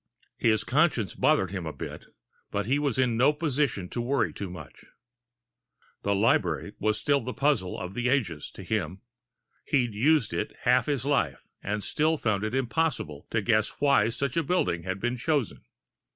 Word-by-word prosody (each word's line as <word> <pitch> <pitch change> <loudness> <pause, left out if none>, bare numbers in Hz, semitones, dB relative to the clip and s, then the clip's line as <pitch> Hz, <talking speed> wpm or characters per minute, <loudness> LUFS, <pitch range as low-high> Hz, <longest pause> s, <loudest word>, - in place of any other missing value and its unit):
His 110 -2 +3
conscience 130 - +2
bothered 95 -2 +2
him 95 -4 -4
a - - -3
bit, - - -8 0.4
but 100 0 -2
he 135 +6 +1
was 140 -4 0
in 125 -3 +2
no 135 +5 +5
position 145 - 0
to 120 - -3
worry 135 +3 0
too 100 - -5
much. 85 -6 -11 1.2
The 100 0 +1
library 100 -2 +1
was 110 0 +1
still 145 -1 +2
the 125 +2 -5
puzzle 140 -11 +1
of 90 +1 -6
the 120 +3 0
ages 105 - 0
to - - -8
him 95 -4 -2 0.6
he'd 125 -6 +1
used 135 +4 +2
it - - -3
half 125 +3 +3
his 140 -4 -1
life, 80 - 0 0.2
and 105 0 -3
still 155 +1 +1
found 110 -6 0
it 110 +3 -2
impossible 130 - -1
to 110 -2 0
guess 110 -1 +1
why 140 -7 +4
such 135 +4 -3
a 165 - +3
building 140 - 0
had 95 +2 -4
been 120 +4 -1
chosen. 140 -1 -1
120 Hz, 175 wpm, -27 LUFS, 100-140 Hz, 1.2 s, no